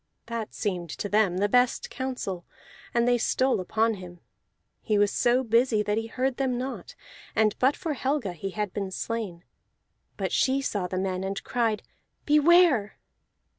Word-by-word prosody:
That 230 -2 -5
seemed 180 -5 -2
to - - -3
them 205 -3 +2
the 205 +2 +2
best 245 +3 +2
counsel, 250 -9 -4 0.5
and 235 0 +2
they 245 0 +3
stole 260 +1 +2
upon 220 +5 +1
him. 180 -3 -10 0.6
He 215 -2 +1
was 205 0 +3
so 250 +1 +2
busy 230 -2 +3
that 210 0 0
he 225 - -5
heard 255 +2 -1
them 260 -3 0
not; 260 +2 -5 0.4
and 220 -2 +3
but 265 +3 +3
for 330 -4 -3
Helga 265 -8 -1
he 185 +4 -5
had 210 -1 -3
been 195 -2 -3
slain. 190 -4 -4 0.7
But - - -2
she 265 +1 +2
saw 205 -9 -2
the 185 - -4
men, 185 0 -1
and 195 +1 -3
cried 225 -4 0 0.4
"Beware!" 300 - +4
225 Hz, 165 wpm, -27 LUFS, 195-255 Hz, 0.7 s, Beware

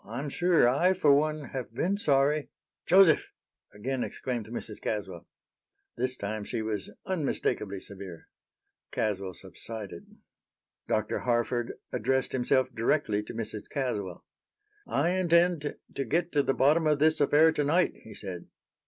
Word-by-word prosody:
"I'm 125 +7 -5
sure 175 -3 +3
I, 170 +9 +3
for 150 -6 +5
one, 150 -1 0
have 125 -4 -5
been 185 +9 +1
sorry" 145 -4 +2 0.4
"Joseph!" 185 -4 +5 0.4
again 125 +5 -3
exclaimed 120 -4 -4
Mrs. 110 -2 -7
Caswell. 95 -5 -4 0.7
This 125 +1 -2
time 105 +1 -4
she 110 +2 -3
was 105 -3 -3 0.2
unmistakably 140 - -1
severe. 95 -4 -8 0.6
Caswell 95 -3 -2
subsided. 105 -6 -7 0.8
Dr. 110 -1 0
Harford 120 0 0 0.2
addressed 130 +4 0
himself 130 0 +1
directly 115 -2 +1
to 105 - -8
Mrs. 110 -2 -5
Caswell. 105 - -3 0.6
"I 150 +5 +1
intend 175 -4 +2 0.2
to 135 - -2
get 170 +7 0
to 145 - +3
the 135 - 0
bottom 155 +4 +4
of 150 -1 +3
this 155 +1 +3
affair 150 +3 +5
tonight," 155 +4 +2
he 110 -2 -11
said. 90 -4 -7
130 Hz, 135 wpm, -29 LUFS, 110-155 Hz, 0.8 s, for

